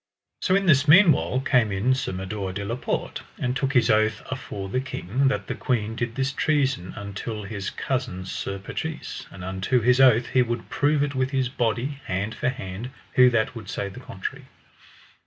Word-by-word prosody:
So 185 Hz, -, +3 dB
in 195 Hz, 0 st, +2 dB
this 145 Hz, -4 st, +4 dB
meanwhile 160 Hz, -6 st, +6 dB
came 125 Hz, -6 st, +3 dB
in 100 Hz, +7 st, +2 dB
Sir 130 Hz, -, -2 dB
Mador 95 Hz, +1 st, -4 dB
de 100 Hz, +1 st, -4 dB
la 115 Hz, +3 st, -2 dB
Porte, 125 Hz, -, -3 dB, 0.2 s
and 125 Hz, 0 st, -1 dB
took 135 Hz, 0 st, 0 dB
his 125 Hz, -, +4 dB
oath 110 Hz, 0 st, +2 dB
afore 100 Hz, -7 st, -5 dB
the 115 Hz, +7 st, -1 dB
king, 130 Hz, 0 st, -1 dB
that 105 Hz, -7 st, 0 dB
the -, -, -3 dB
queen 115 Hz, -3 st, -1 dB
did 120 Hz, 0 st, -3 dB
this 135 Hz, +1 st, 0 dB
treason 135 Hz, -, 0 dB
until 105 Hz, +1 st, -5 dB
his 100 Hz, -1 st, -4 dB
cousin 125 Hz, -9 st, -3 dB
Sir 100 Hz, +1 st, -4 dB
Patrise, 155 Hz, +11 st, -5 dB
and 90 Hz, -, -10 dB
unto 95 Hz, +7 st, 0 dB
his 125 Hz, +3 st, +4 dB
oath 120 Hz, -2 st, +5 dB
he 130 Hz, -, +4 dB
would 120 Hz, -1 st, -2 dB
prove 145 Hz, 0 st, +2 dB
it 145 Hz, -1 st, -2 dB
with 130 Hz, 0 st, 0 dB
his 130 Hz, -2 st, 0 dB
body, 125 Hz, +3 st, -1 dB
hand 100 Hz, +4 st, -2 dB
for -, -, -1 dB
hand, 115 Hz, -2 st, -6 dB, 0.2 s
who 125 Hz, 0 st, +7 dB
that 115 Hz, -1 st, +1 dB
would 110 Hz, -5 st, -9 dB
say 100 Hz, +1 st, -3 dB
the 95 Hz, -, -10 dB
contrary. -, -, -6 dB
120 Hz, 195 wpm, -25 LUFS, 100-135 Hz, 0.2 s, who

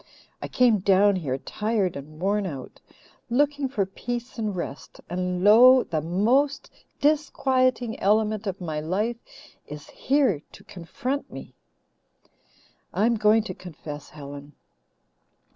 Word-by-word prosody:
I -, -, -4 dB
came 240 Hz, -4 st, +3 dB
down 195 Hz, +1 st, +4 dB
here 135 Hz, -7 st, -2 dB
tired 210 Hz, +4 st, -2 dB
and 155 Hz, +2 st, -10 dB
worn 200 Hz, +2 st, 0 dB
out, 135 Hz, -6 st, -8 dB, 0.5 s
looking 285 Hz, +2 st, +1 dB
for 210 Hz, -7 st, 0 dB
peace 240 Hz, +5 st, -6 dB
and 210 Hz, -3 st, -2 dB
rest 150 Hz, -5 st, -7 dB
and 180 Hz, 0 st, -2 dB
lo! 245 Hz, +5 st, +7 dB
the 155 Hz, -3 st, -2 dB
most 250 Hz, -, +1 dB, 0.3 s
disquieting 260 Hz, -5 st, +1 dB
element 215 Hz, +1 st, +1 dB
of 195 Hz, 0 st, -3 dB
my 160 Hz, -4 st, -4 dB
life 205 Hz, +9 st, -1 dB, 0.5 s
is 150 Hz, 0 st, -10 dB
here 260 Hz, -, +1 dB
to -, -, -14 dB
confront 250 Hz, -, -5 dB
me. -, -, -10 dB, 1.4 s
"I'm 225 Hz, +4 st, +2 dB
going 215 Hz, 0 st, +3 dB
to 225 Hz, -, -6 dB
confess, 150 Hz, -4 st, -9 dB
Helen. 145 Hz, 0 st, -10 dB
205 Hz, 125 wpm, -25 LUFS, 175-245 Hz, 1.4 s, lo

